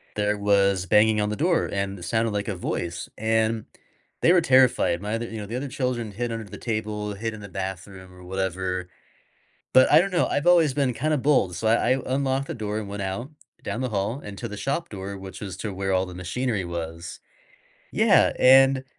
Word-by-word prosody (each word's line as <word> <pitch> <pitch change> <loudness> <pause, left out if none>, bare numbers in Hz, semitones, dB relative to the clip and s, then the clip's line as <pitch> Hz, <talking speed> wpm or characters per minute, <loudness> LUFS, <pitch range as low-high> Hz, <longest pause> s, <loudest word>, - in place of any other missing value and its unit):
there 105 0 0
was 100 -2 +2
banging 105 +2 +4
on 105 - 0
the 105 - -2
door 170 +3 +1
and 100 0 -2
it - - -10
sounded 110 +5 0
like 100 +1 -2
a 100 - -2
voice, 85 -1 -4
and 110 0 0 0.6
they 170 - +5
were 175 - +5
terrified. 130 - +3
My 105 +2 -2
other 120 +1 -3
you 115 - -7
know, 105 - -5
the 115 - -5
other 140 +2 -4
children 125 -4 -2
hid 120 +3 -3
under 115 -1 -4
the 100 +1 -10
table, 105 -2 -3
hid 110 +2 -4
in 105 - -9
the 100 - -9
bathroom 95 0 -7
or 90 0 -14
whatever. 95 -1 -3 0.9
But 130 - +6
I 155 - +8
don't 195 +1 -1
know, 175 - +2
I've 145 +4 -1
always 165 -5 +5
been 135 -4 +1
kinda 150 +4 0
bold, 130 -10 +2
so 110 - -3
I 120 +2 +3
I - - -7
unlocked 135 +1 0
the - - -4
door 105 -2 -3
and 105 -2 -6
went 100 0 -5
out 95 +9 -4 0.3
down 115 - -3
the 130 - -1
hall 105 +6 -2
and 100 -1 -8
to 120 - -4
the 105 - -7
shop 140 +9 -2
door, 100 0 -6
which 95 +2 -9
is 95 -3 -6
to 105 -3 -4
where 95 0 -2
all 95 0 +1
the 90 - -9
machinery 100 +3 -2
was. 85 0 -6 0.7
Yeah, - - +4
and 135 +1 +6
105 Hz, 220 wpm, -25 LUFS, 95-125 Hz, 0.9 s, I